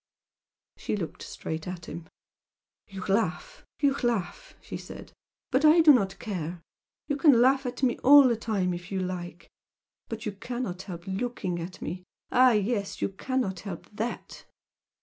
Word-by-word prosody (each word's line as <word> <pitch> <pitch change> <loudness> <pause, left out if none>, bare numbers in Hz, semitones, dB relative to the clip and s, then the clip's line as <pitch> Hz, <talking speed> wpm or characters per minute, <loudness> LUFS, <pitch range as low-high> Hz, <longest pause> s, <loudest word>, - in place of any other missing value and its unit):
She - - -2
looked 175 -6 -5
straight 160 +2 -6
at 180 -2 -6
him. 170 0 -8 0.8
"You 195 -3 -7
laugh, 195 -4 -1 0.2
you 280 -2 +3
laugh!" 240 - -2
she - - -8
said - - -9 0.4
"But 260 +4 +2
I 310 +2 +7
do 310 -2 +8
not 195 -7 +1
care! 175 -5 -4 0.5
You 290 - 0
can 280 -4 +5
laugh 265 +2 +4
at 245 +2 -6
me 245 -2 +2
all 280 +1 +8
the 235 - +2
time 205 -5 -1
if 175 +1 -8
you 195 - -1
like. 175 -2 -5 0.6
But 225 -1 -5
you 210 - -1
cannot 210 -2 -5
help 175 -3 -8
looking 190 -3 -3
at 175 +2 -7
me! 180 +3 -5 0.3
Ah 255 0 +6
yes! 210 -1 -1
you - - +1
cannot 195 -2 -2
help 195 -1 -8
THAT!" 225 +3 -5
205 Hz, 160 wpm, -28 LUFS, 180-250 Hz, 0.8 s, do